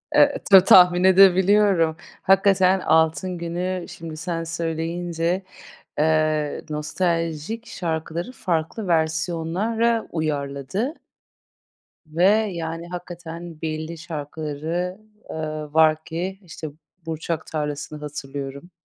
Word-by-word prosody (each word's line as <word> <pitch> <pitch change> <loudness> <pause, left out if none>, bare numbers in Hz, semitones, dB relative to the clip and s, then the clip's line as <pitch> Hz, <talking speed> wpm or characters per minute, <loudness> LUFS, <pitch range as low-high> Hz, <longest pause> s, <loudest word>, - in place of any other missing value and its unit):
Eee, - - +5
ta 190 -1 +10
tahmin 180 -1 +7
edebiliyorum. 190 -2 +5 0.3
Hakikaten 190 -1 +4
Altın 160 +3 +2
Gün'ü 175 +2 -3
şimdi 160 -2 -8
sen 165 0 -3
söyleyince, 170 +2 -2 0.6
eee, 155 -1 +1
nostaljik 165 +6 -2
şarkıları 165 +4 -4
farklı 180 0 -2
versiyonlara 175 +8 0
uyarladı. 155 - -2 1.1
Ve, 165 +3 -1 0.3
yani, 165 0 -5
hakikaten 175 -2 -8
belli 160 +1 -4
şarkıları, 160 +3 -4 0.3
ııı, 155 -1 -5
var 160 0 +4
ki, 180 +4 -4
işte, 165 -3 -8 0.4
Burçak 160 0 -3
Tarlası'nı 150 0 -4
hatırlıyorum. 140 +1 -7
165 Hz, 90 wpm, -23 LUFS, 155-180 Hz, 1.1 s, ta